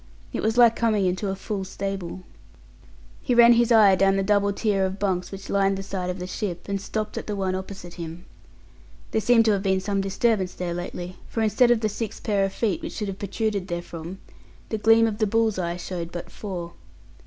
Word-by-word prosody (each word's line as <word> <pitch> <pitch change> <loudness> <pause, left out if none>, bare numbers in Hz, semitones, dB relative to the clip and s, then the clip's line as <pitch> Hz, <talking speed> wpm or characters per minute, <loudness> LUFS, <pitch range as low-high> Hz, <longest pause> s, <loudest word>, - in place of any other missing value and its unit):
It - - -2
was 220 +2 0
like 235 -2 +7
coming 215 -4 +1
into 185 +2 -1
a 190 - -2
full 195 0 -4
stable. 190 -1 -5 1.0
He 250 - 0
ran 235 0 +8
his 235 0 +3
eye 215 -4 +7
down 195 +1 +3
the 195 - +1
double 200 0 +2
tier 200 -1 0
of 190 0 -1
bunks 190 -3 -1
which 195 0 -8
lined 195 -1 +2
the 195 - -5
side 190 -2 -4
of 180 - -3
the 180 - -5
ship, 185 -2 -4
and 200 -1 -2
stopped 215 +1 -3
at - - -10
the 210 - -2
one 190 -2 -1
opposite 185 -2 -6
him. 170 +1 -8 0.9
There 220 - +1
seemed 230 0 +4
to 220 - +4
have 200 -2 +1
been 190 -1 +1
some 195 +1 -1
disturbance 195 -1 0
there 175 -1 -3
lately, 175 +1 -6
for 225 - -1
instead 235 +3 +4
of 240 -2 +3
the 215 - +2
six 215 +1 -5
pair 200 -2 +1
of 195 - -3
feet 230 - -1
which 325 - -6
should 210 -3 -3
have 195 0 -6
protruded 200 -1 -2
therefrom, 175 0 -6 0.5
the 220 - -2
gleam 225 +1 +5
of 220 -1 -2
the 215 - +2
bull's 220 -1 +1
eye 170 -1 -2
showed 175 -1 -5
but 175 -1 -7
four. 175 -5 -6
195 Hz, 220 wpm, -25 LUFS, 185-220 Hz, 1.0 s, ran